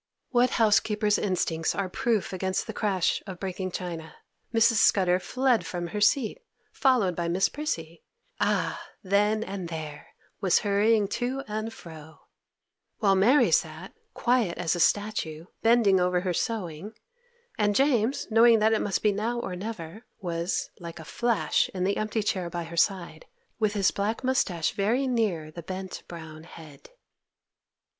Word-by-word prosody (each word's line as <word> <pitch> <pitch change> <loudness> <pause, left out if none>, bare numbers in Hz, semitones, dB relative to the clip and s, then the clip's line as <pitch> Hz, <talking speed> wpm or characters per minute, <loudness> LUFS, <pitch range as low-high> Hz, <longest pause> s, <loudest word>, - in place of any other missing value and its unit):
What 250 0 +4
housekeeper's 210 -1 +3
instincts 170 -4 -1
are 200 -1 -1
proof 215 +1 -1
against 190 0 -1
the - - -6
crash 195 -5 0
of 185 -2 -7
breaking 185 -1 -4
china? 170 -3 -6 0.4
Mrs. 230 0 +4
Scudder 180 -2 +4
fled 255 0 +1
from 175 +1 -4
her 210 +3 -4
seat, 220 +2 +2 0.3
followed 240 -10 +2
by 170 0 -2
Miss 180 +3 +2
Prissy— 170 - -4 0.4
'Ah, - - 0 0.2
then 210 +3 +2
and 190 -5 -6
there 155 -3 -7 0.3
was 190 -4 +3
hurrying 205 +1 +2
to 255 +5 -2
and 215 +1 -3
fro' 160 -6 -12 0.8
—while 200 -4 +3
Mary 230 - +4
sat, 160 +3 -1 0.2
quiet 240 -8 +1
as 175 -1 0
a - - -4
statue, 170 -5 0 0.2
bending 225 -5 +4
over 180 0 +1
her 180 -1 -1
sewing, 195 -2 -3 0.7
and 205 -1 +2
James, 265 -2 +2
knowing 230 +1 +6
that 220 +1 +3
it 220 - +1
must 200 -3 -1
be 210 - +4
now 225 +4 -2
or 185 -6 -4
never, 200 0 -7
was, 170 0 -2
like 170 -2 -8
a 160 - -10
flash, 235 +6 +1
in 180 - -1
the 200 +2 0
empty 215 0 -1
chair 185 -4 -1
by 170 0 -4
her 165 +1 -9
side, 170 -2 0 0.3
with 215 -2 +1
his 200 -2 +2
black 210 +5 -2
moustache 200 -11 +1
very 230 +7 0
near 210 -11 -1
the 170 - -8
bent, 185 +2 -6
brown 160 -2 -9
head. 160 -4 -13
195 Hz, 155 wpm, -27 LUFS, 170-220 Hz, 0.8 s, knowing